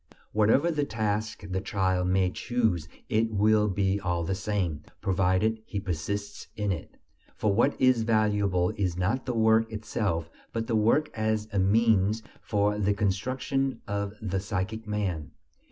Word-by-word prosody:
Whatever 115 +10 +3
task 110 -8 -2
the 95 0 -2
child 95 -2 0
may 95 0 +2
choose 110 -9 0 0.2
it 110 +1 +1
will 105 0 +3
be 100 0 +1
all 90 -3 -1
the 85 - -1
same, 95 -6 -2 0.2
provided 95 +4 +1
he 100 - -3
persists 100 +2 -4
in 105 -2 -1
it. 85 - -6 0.4
For 105 -2 +1
what 120 +7 +2
is 130 -3 +4
valuable 105 -5 +2
is 90 -4 -1
not 105 +10 -1
the 125 - -1
work 110 0 +3
itself, 105 -6 -2 0.2
but 115 0 -1
the 115 -1 -1
work 115 +8 +3
as 110 -1 -1
a 100 - +2
means 110 +1 +3 0.2
for 105 0 0
the 100 0 +2
construction 130 +7 -1
of 100 -1 -2
the 95 -3 -2
psychic 105 +3 -3
man. 95 -8 -2
105 Hz, 150 wpm, -28 LUFS, 95-110 Hz, 0.4 s, is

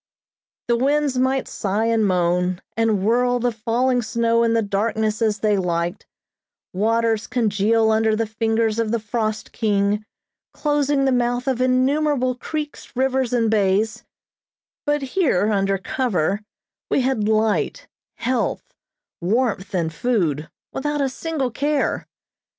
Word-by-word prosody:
The 240 - +3
winds 280 +1 +1
might 260 +1 +1
sigh 205 +2 -1
and 225 -1 +2
moan, 180 0 +1 0.2
and 220 -4 +1
whirl 245 +2 +3
the 245 0 0
falling 240 +3 0
snow 230 +1 +1
in 230 -1 +2
the 230 -1 +2
darkness 215 +2 -1
as 215 -2 +1
they 210 -2 +2
liked; 175 -2 -2 0.7
waters 225 +2 +1
congeal 220 -1 +2
under 220 0 +2
the 225 +1 0
fingers 225 0 0
of 225 -1 0
the 230 +1 0
frost 215 0 -3
king, 205 -1 +1 0.5
closing 290 -2 +1
the 265 - +3
mouth 245 +1 0
of 255 -2 0
innumerable 255 +1 +2
creeks, 295 +2 -6
rivers, 265 -1 +1
and 230 -3 +2
bays; 205 +1 +1 0.8
but 295 -1 +1
here 255 - +1
under 195 -1 +1
cover 195 -3 -1 0.5
we - - +2
had 245 -5 0
light, 220 - 0 0.3
health, 255 - -2 0.5
warmth 200 0 0
and 165 -3 -1
food, 165 - 0 0.2
without 295 +1 -1
a 275 - +1
single 275 -2 -3
care. 285 +3 -1
230 Hz, 135 wpm, -22 LUFS, 210-255 Hz, 0.8 s, The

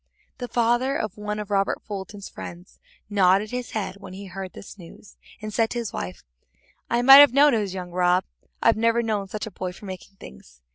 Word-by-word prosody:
The 245 - -4
father 240 +3 +1
of 215 -4 -4
one 210 0 -4
of 210 -1 -6
Robert's 200 0 -3
friends 175 +2 -11 0.3
nodded 200 0 +3
his 250 -1 -4
head 195 -2 -4
when 200 -2 -11
he 200 +1 -8
heard 190 0 -7
this 200 - -12
news, 175 +4 -14 0.3
and 215 0 -5
said 225 0 +1
to - - -4
his 235 -3 -4
wife: 90 0 -6 0.7
"I 240 +1 +1
might 270 +2 +10
have 285 -3 +8
known 285 +1 +5
it 225 - +2
was 195 -3 -4
young 180 -1 -6
Rob; 180 +1 +2 0.4
I've 230 - +4
never 230 +1 +2
known 210 -3 -2
such 210 +2 -5
a 220 - -8
boy 185 -2 -5
for 205 - -13
making 190 +1 -9
things. 65 - -15
205 Hz, 205 wpm, -24 LUFS, 185-230 Hz, 0.7 s, might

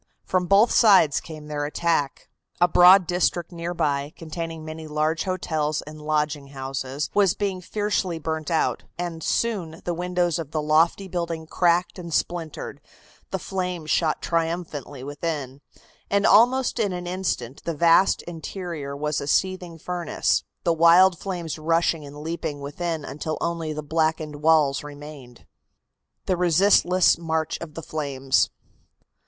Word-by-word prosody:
From 180 -1 0
both 205 +5 +5
sides 195 -10 +5
came 155 -2 -10
their 150 -1 -3
attack. 150 -1 -1 0.3
A 175 - +5
broad 180 +2 +7
district 175 -1 0
near 170 0 -5
by, 145 -2 -1
containing 165 -1 -6
many 155 0 -7
large 155 +2 0
hotels 155 -5 -1
and 155 +1 -11
lodging 150 -1 -1
houses, 135 +1 -4
was 195 -3 +3
being 195 -3 -2
fiercely 205 -3 -1
burnt 160 -1 -3
out, 165 -2 +1 0.2
and 170 -2 -4
soon 180 -6 -1
the 175 - -1
windows 175 -1 0
of 160 -4 -5
the 155 - -2
lofty 165 +5 +2
building 170 -3 -3
cracked 175 +3 +1
and 170 -1 -7
splintered, 160 -4 -3 0.5
the 190 - -2
flames 180 -4 -4
shot 160 -3 +1
triumphantly 165 -5 -3
within, 145 -2 -4 0.5
and 200 +1 +2
almost 245 +5 +4
in 205 -4 +1
an 180 0 -5
instant 175 -9 -3
the 170 - -3
vast 170 +5 +4
interior 165 -4 -6
was 150 0 -1
a 140 - -5
seething 180 0 0
furnace, 175 +1 -1 0.2
the 170 - +2
wild 170 +2 +6
flames 175 -5 -4
rushing 165 0 +1
and 145 +1 -10
leaping 160 -2 -4
within 155 +2 -4
until 150 +3 -4
only 170 -2 -2
the 155 0 -5
blackened 155 -1 -1
walls 150 -3 +3
remained. 145 -4 -11 0.8
THE 185 - 0
RESISTLESS 180 0 +4
MARCH 160 -1 -2
OF 160 -3 -8
THE 165 - -6
FLAMES. 140 -4 0
165 Hz, 145 wpm, -24 LUFS, 150-180 Hz, 0.8 s, broad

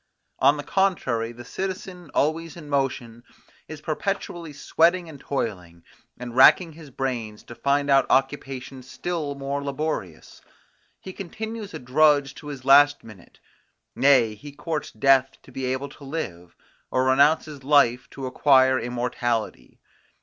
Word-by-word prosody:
On 140 +3 +4
the 145 - -5
contrary, 135 -12 0
the 120 +1 -12
citizen 185 0 -6
always 160 +2 0
in 155 -3 -10
motion, 125 -4 -2 0.4
is 155 -1 -9
perpetually 170 0 -4
sweating 170 +5 +1
and 150 -3 -11
toiling, 90 -12 -5 0.3
and 120 -1 -8
racking 165 +6 +6
his 155 -2 -13
brains 120 -5 -4
to - - -11
find 140 +3 0
out 135 -2 +4
occupations 135 -1 -2
still 145 +2 -4
more 140 +1 -4
laborious: 140 - -5 0.6
He 190 - -9
continues 215 +3 -7
a - - -3
drudge 140 +2 +3
to 150 - -11
his 140 -3 -8
last 145 +1 +6
minute; 105 -6 -15 0.6
nay, 130 -6 +4
he 125 +8 -11
courts 155 +1 -4
death 135 +3 +2
to - - -16
be 130 +1 -4
able 130 +2 -2
to 140 - -15
live, 95 - -6 0.3
or 130 0 +1
renounces 145 +2 +2
life 130 -4 +3
to 135 - -7
acquire 130 0 +4
immortality. 120 -1 -3
140 Hz, 140 wpm, -24 LUFS, 125-155 Hz, 0.6 s, racking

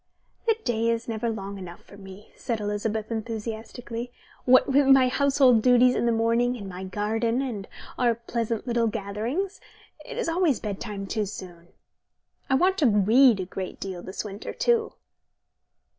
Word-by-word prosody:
"The 450 -1 +3
day 230 -1 0
is 230 0 -1
never 230 0 -2
long 200 -2 -5
enough 175 -2 -10
for - - -15
me," 195 +1 -13
said 230 -2 -3
Elizabeth 210 +1 -2
enthusiastically. 230 +2 -5 0.3
"What 255 0 +6
with 275 0 +3
my 265 -2 +6
household 270 -3 +4
duties 250 +1 +5
in 235 - 0
the - - +3
morning, 230 +2 +1
and 200 -4 -8
my 185 0 -7
garden, 225 +5 -1
and 230 -8 -4 0.3
our 240 -2 +3
pleasant 230 -1 -3
little 235 -2 +1
gatherings, 225 - -3 0.4
it - - -8
is 485 - -1
always 330 -5 +2
bedtime 205 -1 -5
too 210 +1 -2
soon. 175 -4 -9 0.8
I 265 - +4
want 375 +7 +2
to 290 - +4
read 220 +3 +5
a 185 - -2
great 185 0 -6
deal 190 -3 -5
this 190 +4 -6
winter, 205 0 -6
too." 465 -2 +1
230 Hz, 160 wpm, -26 LUFS, 205-250 Hz, 0.8 s, What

